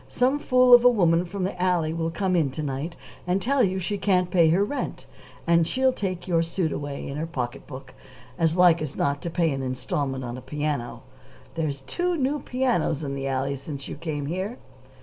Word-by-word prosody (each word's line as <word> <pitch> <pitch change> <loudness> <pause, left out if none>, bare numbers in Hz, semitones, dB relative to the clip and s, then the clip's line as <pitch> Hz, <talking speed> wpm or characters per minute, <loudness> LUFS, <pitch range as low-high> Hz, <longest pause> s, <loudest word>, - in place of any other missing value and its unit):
"Some 260 +4 +1
fool 255 -3 +5
of 240 0 +9
a 245 - +8
woman 175 -6 +3
from 190 +2 -4
the 185 - -2
alley 175 -4 +1
will 165 0 -1
come 185 +2 -1
in 160 -5 +2
to 155 - -4
night 145 +4 -4 0.3
and 180 +2 +2
tell 270 +6 +1
you 190 -2 +1
she 195 +2 -3
can't 185 -2 +1
pay 170 -3 +5
her 185 +5 +3
rent, 285 +7 -4 0.4
and 170 -1 +3
she'll 260 0 +2
take 185 -6 -4
your 170 -2 +2
suit 165 -1 -1
away 145 -1 -5
in 140 - -5
her 160 +2 -3
pocket 130 -5 -5
book 130 -2 -10 0.4
as 165 0 +1
like 175 -2 +5
as 150 -3 -4
not 140 0 0
to 170 - -3
pay 165 -1 +1
an 135 -1 -2
installment 130 +1 -2
on 120 +1 -5
a - - -12
piano. 145 -3 -3 0.5
There's 150 -4 -2
two 350 - -1
new 285 +1 0
pianos 245 - 0
in 140 -1 -3
the 135 0 -3
alley 135 +1 -1
since 140 0 -7
you - - -6
came 150 -2 -4
here." 190 - -3
165 Hz, 210 wpm, -25 LUFS, 140-190 Hz, 0.5 s, of